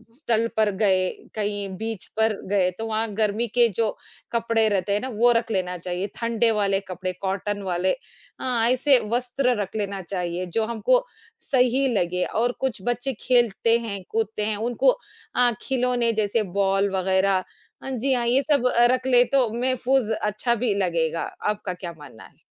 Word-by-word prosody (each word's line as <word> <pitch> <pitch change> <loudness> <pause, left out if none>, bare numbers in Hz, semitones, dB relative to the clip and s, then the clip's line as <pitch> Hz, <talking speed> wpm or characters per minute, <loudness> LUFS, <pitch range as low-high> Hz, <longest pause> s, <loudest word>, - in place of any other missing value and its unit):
स्थल 230 -5 0
पर 215 -1 +3
गए, 190 -2 +2 0.3
कहीं 205 -2 -2
बीच 220 -2 -5
पर 220 0 +3 0.2
गए, 195 -2 +3
तो 220 +5 -6
वहाँ 220 +1 -1
गर्मी 215 +2 0
के 240 +2 +3
जो 225 -2 +3 0.4
कपड़े 230 -1 +2
रहते 200 -1 0
हैं 205 - +2
ना, 260 - -3
वो 240 +1 +3
रख 230 -1 -3
लेना 180 -3 -1
चाहिए। 180 +2 -3
ठंडे 230 0 +1
वाले 195 -1 +2
कपड़े 185 0 -4
कॉटन 200 +1 -2
वाले 180 +2 +1 0.5
अ, - - -5 0.3
ऐसे 260 +1 +4 0.2
वस्त्र 250 +1 0
रख 195 0 -6
लेना 200 -2 -2
चाहिए 180 -1 -3
जो 225 - +2
हमको 235 - +2 0.5
सही 260 +1 +3
लगे 180 -1 0
और 240 +2 0
कुछ 260 -6 -2
बच्चे 245 +2 -1 0.2
खेलते 235 -2 +3
हैं, 205 -4 -5
कूदते 220 -1 -1
हैं। 215 0 0
उनको 240 - +2 0.5
अ, 245 -1 +4
खिलौने 250 -2 +1
जैसे 215 +1 +1 0.2
बॉल 195 0 +2
वग़ैरह 190 0 +2 0.4
अ, - - -5
जी 265 +1 0
हाँ 240 -2 0
ये 255 +3 +3
सब 285 -4 +2 0.3
रख 255 0 0
ले, 245 -1 +6
तो 255 -2 +2
महफ़ूज़ 255 -1 +1
अच्छा 215 +3 0
भी 235 -2 0
लगेगा। 165 -3 0 0.3
आपका 210 -3 -3
क्या 180 -1 -7
मानना 145 -9 -13
है? - - -18
220 Hz, 170 wpm, -24 LUFS, 195-245 Hz, 0.5 s, ले